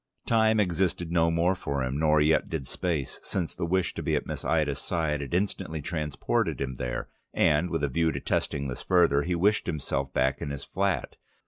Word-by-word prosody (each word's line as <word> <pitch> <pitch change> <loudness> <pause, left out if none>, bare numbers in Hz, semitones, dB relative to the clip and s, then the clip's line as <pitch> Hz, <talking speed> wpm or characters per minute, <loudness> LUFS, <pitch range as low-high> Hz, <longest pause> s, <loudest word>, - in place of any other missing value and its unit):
Time 110 -1 +3
existed 90 -2 0
no 85 -1 +3
more 85 +3 +2
for 70 -7 -3
him, 65 +3 -2
nor 75 -1 +4
yet 75 +2 +3
did 80 -5 -3
space, 80 -2 -3
since 90 -4 -3
the 85 - -3
wish 95 0 +1
to - - -5
be - - 0
at - - -1
Miss - - -5
Ida's 75 -2 +1
side 80 -4 -1
had 70 +4 -3
instantly 90 -4 -1
transported 75 -2 -1
him 65 -2 -3
there, 60 -1 -3 0.3
and 75 +4 +3
with 80 -3 -2
a - - +3
view 80 +4 +1
to - - -3
testing 70 -1 -1
this 65 - -5
further 85 -6 +4
he 90 +4 -1
wished 105 +5 +2
himself 70 -4 -2
back 65 +1 +1
in 70 - -3
his 70 0 -5
flat. 100 0 -1
80 Hz, 205 wpm, -27 LUFS, 70-90 Hz, 0.3 s, nor